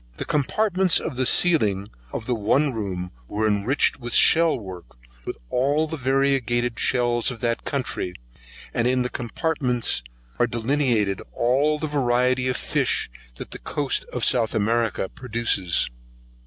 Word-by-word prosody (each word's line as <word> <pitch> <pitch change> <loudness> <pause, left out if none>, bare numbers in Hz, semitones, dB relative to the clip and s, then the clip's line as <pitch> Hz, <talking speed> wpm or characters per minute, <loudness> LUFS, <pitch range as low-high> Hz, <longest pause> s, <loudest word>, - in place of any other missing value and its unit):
The - - -4
copartments 185 +5 +1
of 155 - -5
the 130 0 +1
ceiling 105 - +3 0.2
of - - -5
the 125 - 0
one 125 +6 +1
room 95 -5 -4 0.2
was 110 - -1
enriched 105 +7 +1
in 120 - -5
shell 165 +6 +4
work, 95 -4 -10 0.3
with - - -5
all 145 +5 +1
the 160 +1 -5
variegated 130 -4 +1
shells 120 -1 +2
of 125 -3 -6
that 115 -1 -1
country, 120 -9 -3 0.6
and 120 0 +1
in 125 0 +2
the 125 - -3
copartments 125 - -1 0.4
are 120 - +3
delineated 115 -4 0
all 140 +6 +1
the 155 - -3
variety 130 -3 +1
of 130 - 0
fish - - 0 0.2
that - - -9
the - - -7
coast 145 -2 -1
of 125 - -1
South 115 -2 +2
America 110 -1 0
produces. 115 - +1
125 Hz, 145 wpm, -23 LUFS, 110-140 Hz, 0.6 s, shell